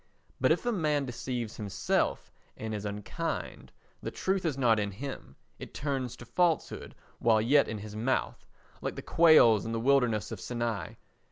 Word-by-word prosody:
But - - +3
if - - +1
a 240 - +2
man 150 -8 +1
deceives 120 -2 -4
himself 105 -3 -1 0.3
and 110 0 -4
is 105 -1 -4
unkind, 105 0 -4 0.3
the - - -3
truth 190 -1 -1
is 150 -5 0
not 115 -5 +3
in 100 -1 -1
him, 105 - -7 0.2
it - - -9
turns 130 -1 -2
to 120 - -10
falsehood 170 +4 0 0.2
while 115 -2 +4
yet 140 +6 +4
in 110 - -4
his 105 0 -8
mouth, 120 +5 -1 0.3
like - - -3
the - - -7
quails 155 -11 +6
in 115 - -4
the 115 - -1
wilderness 125 -4 +2
of 110 -5 -6
Sinai. 120 -3 -3
120 Hz, 170 wpm, -30 LUFS, 110-140 Hz, 0.3 s, quails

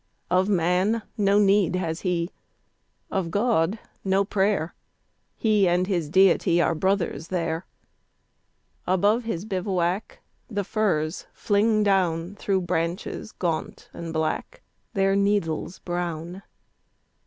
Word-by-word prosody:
Of 185 +2 +3
man 185 +4 +2
no 200 -1 +3
need 200 -3 +4
has 170 -3 -2
he, 175 -2 -1 0.8
of 190 -3 -1
God, 205 -1 +1 0.3
no 195 +1 +2
prayer; 195 -4 0 0.6
He 210 -4 +3
and 175 +1 +2
his 175 -6 -1
Deity 180 -1 +4
are 170 - +3
brothers 175 -1 -1
there. 165 -1 -2 1.2
Above 205 +6 +2
his 200 -4 -3
bivouac 185 -1 -2 0.3
the 205 -3 -2
firs 185 -6 -1
fling 215 +1 +2
down 180 -3 +1
Through 195 -2 0
branches 175 +4 -3
gaunt 165 -3 -4
and 165 -1 -6
black, 160 - -2 0.3
their 195 0 +3
needles 200 -4 0
brown. 175 +1 -4
185 Hz, 110 wpm, -25 LUFS, 170-200 Hz, 1.2 s, need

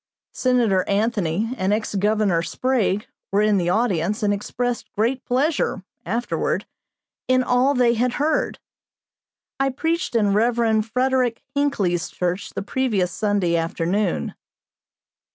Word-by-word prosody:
Senator 235 -7 +2
Anthony 205 0 0
and 190 +1 +1
ex 215 +1 -1
Governor 205 -3 +2
Sprague 215 0 0 0.3
were 205 +2 +3
in 210 -1 +3
the 175 -1 0
audience 210 -1 0
and 205 -1 +3
expressed 240 +4 -3
great 245 +5 0
pleasure, 260 - 0 0.2
afterward, 230 +6 -1 0.6
in 255 0 +3
all 255 +3 +2
they 245 -2 +4
had 240 +1 0
heard. 300 +1 0 1.0
I 270 0 +2
preached 325 +2 -2
in 205 -3 +3
Rev. 225 0 +2
Frederick 250 +1 0
Hinckley's 205 - 0
church 180 +2 -2
the 195 - -3
previous 205 -6 0
Sunday 195 -2 0
afternoon. 170 +4 -1
220 Hz, 120 wpm, -22 LUFS, 195-250 Hz, 1.0 s, they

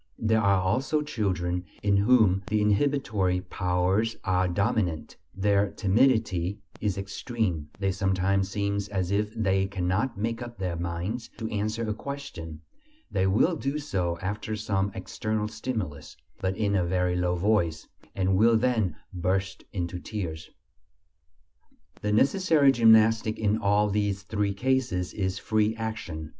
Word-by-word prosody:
There 110 0 +2
are 100 -2 +3
also 130 +11 0
children 90 - -1 0.2
in 100 -1 +3
whom 100 -3 +4
the 105 - +1
inhibitory 105 -4 +1
powers 90 +4 0
are 95 -1 +1
dominant; 90 -3 -1 0.2
their 100 +1 +2
timidity 105 -4 +2 0.2
is 100 -3 -1
extreme: 100 - -3
they 95 -1 0
sometimes 95 0 +1
seem 100 0 -1
as 95 -2 -1
if 105 +1 0
they 95 -3 +1
cannot 95 +6 -1
make 115 +3 -2
up 120 -2 -7
their 90 -3 -2
minds 85 +7 -4
to 110 -1 -4
answer 110 +2 -2
a 105 - 0
question; 110 - -7 0.5
they 95 -1 +1
will 115 - +3
do 140 -1 -2
so 95 - -2
after 105 +3 -3
some 100 -2 -1
external 105 +3 -2
stimulus, 105 - -5 0.2
but 95 +1 -1
in 105 -2 +1
a 95 -3 +2
very 90 0 0
low 90 0 +1
voice, 90 -3 +1 0.3
and 95 -1 +1
will 115 +2 +5
then 110 -8 +1 0.2
burst 95 +2 -1
into 90 -2 -3
tears. 85 -6 -5 1.5
The 105 - -1
necessary 145 - +4
gymnastic 110 -2 +5
in 105 0 +1
all 105 +1 +3
these 100 -1 -1
three 105 -1 -1
cases 125 -6 0
is 95 -2 -2
free 110 +1 +1
action. 110 -9 -5
100 Hz, 140 wpm, -27 LUFS, 95-110 Hz, 1.5 s, will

